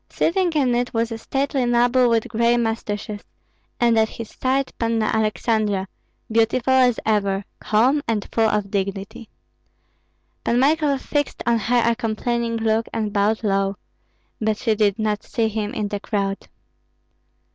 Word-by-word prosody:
Sitting 355 +1 +1
in 270 -5 +2
it 245 0 -1
was 230 +1 0
a 225 - -5
stately 270 +2 -1
noble 245 +1 +3
with 230 -1 +1
gray 235 +1 +2
mustaches, 215 -2 -3 0.6
and 235 -2 +4
at 220 0 +2
his 230 -2 -8
side 270 +1 -1
Panna 230 -1 +1
Aleksandra; 215 -2 0 0.5
beautiful 230 +3 +2
as 250 -3 +4
ever, 200 -2 +1
calm, 250 +7 +2
and 215 -3 -1
full 225 -1 +3
of 210 -2 -1
dignity. 200 +3 -4 1.1
Pan 235 - +1
Michael 290 +1 +2
fixed 290 +2 -2
on 235 -1 +2
her 235 +3 +2
a 235 0 +3
complaining 230 0 -1
look 225 0 0
and 215 -2 -2
bowed 210 +2 +1
low, 195 -1 +1 0.6
but 215 -1 0
she 225 -1 +1
did 205 -1 +1
not 215 -1 -1
see 230 -2 -1
him 215 -1 -3
in 210 - -2
the 205 - -3
crowd. 200 -1 -3
225 Hz, 150 wpm, -22 LUFS, 210-240 Hz, 1.1 s, and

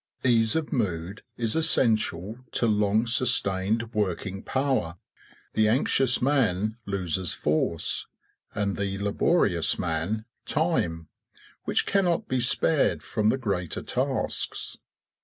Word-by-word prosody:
Ease 115 -1 +3
of 160 -2 -2
mood 95 -4 -2 0.2
is 115 -2 -1
essential 110 - +1
to - - +1
long 105 0 +2
sustained 115 -2 +1
working 95 -2 -2
power. 130 -11 -1 0.6
The 110 0 +3
anxious 125 +2 +2
man 110 -6 +1
loses 95 -3 -1
force, 80 +2 0 0.5
and 100 -1 -1
the 100 -1 -2
laborious 100 - +2
man 90 +6 -2 0.2
time, 120 - 0 0.6
which - - +1
cannot 185 -4 +1
be 130 - 0
spared 140 +4 +2
from 110 -1 0
the 130 - +2
greater 100 - -3
tasks. - - -2
110 Hz, 110 wpm, -26 LUFS, 95-125 Hz, 0.6 s, Ease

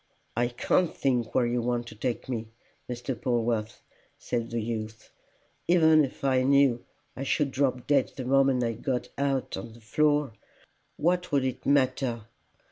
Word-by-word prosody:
"I 120 +1 +2
can't 160 +8 0
think 125 -4 0
where 125 - +4
you 120 0 0
want 120 0 -1
to - - -12
take 120 +2 -3
me, 115 -3 -3 0.4
Mr. 125 +2 -3
Polwarth!" 115 -2 -1 0.3
said 115 -1 -3
the 115 - -2
youth. 110 -1 -5 0.6
"Even 160 -3 +5
if 135 - -6
I 130 -2 +3
knew 135 -2 +3 0.3
I - - -7
should 140 +1 0
drop 130 -2 0
dead 140 -3 +2
the 130 - -5
moment 135 -1 +3
I 115 - 0
got 125 +2 -3
out 135 -2 -1
on 105 +4 -8
the 115 - -15
floor, 145 +3 +1 0.6
what 180 +3 0
would 140 -2 +2
it 130 -1 -4
matter! 130 -4 +1
125 Hz, 160 wpm, -27 LUFS, 120-140 Hz, 0.6 s, Even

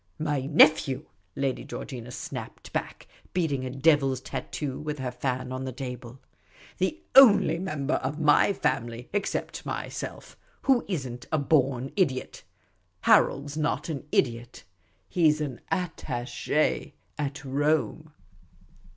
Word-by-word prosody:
" - - -41
My 135 -2 -1
nephew," 150 -2 +5 0.3
Lady 135 -2 -1
Georgina 125 -3 -7
snapped 125 - -7
back, - - -4 0.3
beating 150 -7 0
a - - -3
devil's 135 -1 +3
tattoo 135 +1 -5
with 150 0 -4
her 130 -2 -3
fan 130 0 -3
on 130 0 -4
the 130 - -4
table. 125 -1 -7 0.3
" - - -24
The 315 - -1
only 245 -10 +7
member 155 -6 -2
of 145 +4 -2
my 150 +5 +5
family, 120 -9 -2
except 205 -1 -2
myself, - - -6 0.3
who 265 -4 +4
is 170 -9 -2
n' 120 -1 -6
t - - -14
a 155 - +2
born 135 -3 +1
idiot. 140 -10 0 0.6
Harold 140 +1 +4
's 150 - -7
not 155 +2 -1
an 150 -2 -5
idiot; 120 -1 0 0.4
he 170 -3 +4
's 150 - -3
an 140 -5 -4
attache 150 -5 -1 0.2
at 140 -1 -3
Rome." 145 -2 0
140 Hz, 140 wpm, -27 LUFS, 130-155 Hz, 0.6 s, only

